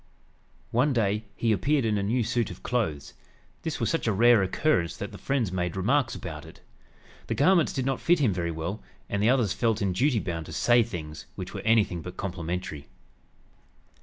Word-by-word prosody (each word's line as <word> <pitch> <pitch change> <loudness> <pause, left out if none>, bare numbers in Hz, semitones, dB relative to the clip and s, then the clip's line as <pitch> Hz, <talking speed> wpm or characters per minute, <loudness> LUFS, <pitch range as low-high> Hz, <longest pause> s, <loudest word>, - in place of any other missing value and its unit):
One 130 +5 +2
day 105 -2 0
he 115 - +1
appeared 135 +7 +2
in 105 -2 +1
a - - -1
new 115 +5 +1
suit 115 0 0
of 90 - -10
clothes. 90 - -2 0.5
This 160 -2 -3
was - - 0
such 165 - -1
a - - +3
rare 115 +2 +5
occurrence 95 - +1
that 100 - -5
the 100 - -10
friends 130 -8 0
made 90 -2 -2
remarks 120 +6 +1
about 80 -3 -7
it. - - -14 0.7
The - - -1
garments 170 +2 +4
did 130 -2 -2
not 135 -1 -1
fit 175 +1 +4
him 130 - +2
very 85 -1 -2
well, 85 +6 -4 0.3
and 100 - 0
the 110 - +4
others 125 -7 +2
felt 115 -2 +1
in 100 -4 0
duty 125 +6 +2
bound 85 -6 -3
to - - -8
"say 120 0 +4
things" 80 -9 -6
which - - -7
were - - -5
anything 105 -6 +2
but 90 +2 -9
complimentary. 85 -5 -4
105 Hz, 195 wpm, -27 LUFS, 90-125 Hz, 0.7 s, rare